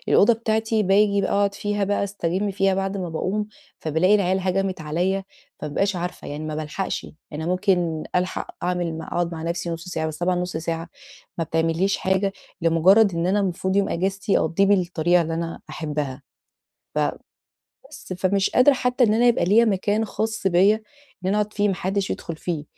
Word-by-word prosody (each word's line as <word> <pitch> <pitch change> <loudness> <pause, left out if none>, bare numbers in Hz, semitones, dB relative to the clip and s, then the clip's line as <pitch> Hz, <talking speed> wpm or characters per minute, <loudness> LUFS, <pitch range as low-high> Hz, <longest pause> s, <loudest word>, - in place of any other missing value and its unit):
الأوضة 235 - +6
بتاعتي، 220 -1 0
باجي 200 +1 +3
بقى - - -1
أقعد 200 0 +2
فيها 205 0 -1
بقى، 205 +1 0
أستجم 200 0 -2
فيها 195 0 +1
بَعد 195 +1 -2
ما 185 -3 -3
باقوم، 200 +6 -2 0.3
فبالاقي 160 +6 +2
العيال 190 -2 +2
هَجمِت 190 -1 -1
عليّا، 180 +5 -1 0.3
فما 150 - -5
بابقاش 195 +6 0
عارفة 175 +1 -5
يعني 145 +2 -5
ما 155 0 -4
بالحقش، 155 +5 -3 0.3
أنا 155 +2 -4
ممكن 180 -3 +1
ألحق 180 +1 -2
أعمل 175 -2 -1
م 160 - -6
أقعد 175 +1 -2
مع 160 -1 -5
نفسي 170 +1 -3
نُص 165 +1 -6
ساعة، 160 -3 -2
بس 155 -1 -5
طبعًا 180 +1 +1
نُص 180 -2 -3
ساعة 165 +1 -3 0.5
ما 165 - 0
بتعمليش 165 +5 +1
حاجة، 190 +1 0 0.3
لمجرّد 180 +5 +5
إن 170 +1 0
أنا 200 +3 +2
المفروض 190 0 -1
يوم 200 -1 +2
أجازتي 195 +3 0
أقّضيه 165 +5 +2
بالطريقة 175 -3 +3
اللي 165 0 -3
أنا 165 0 -4
أحبها، 150 -3 -4 0.7
ف - - +1 0.9
بس، - - -9
فمش 190 +2 +1
قادرة 255 +3 +6
حتى 250 0 +2
إن 215 -2 +3
أنا 240 +2 +3
يبقى 240 - +3
ليّا 210 +6 +5
مكان 210 +1 +1
خاص 220 0 -3
بيّا، 190 +4 +5 0.5
إن - - 0
أنا 200 - +2
أقعد 210 0 -2
فيه 205 0 +1
ما 195 - +1
حدش 195 +2 -2
يدخل 165 -2 -4
فيه، 160 -3 -4
185 Hz, 185 wpm, -23 LUFS, 165-200 Hz, 0.9 s, الأوضة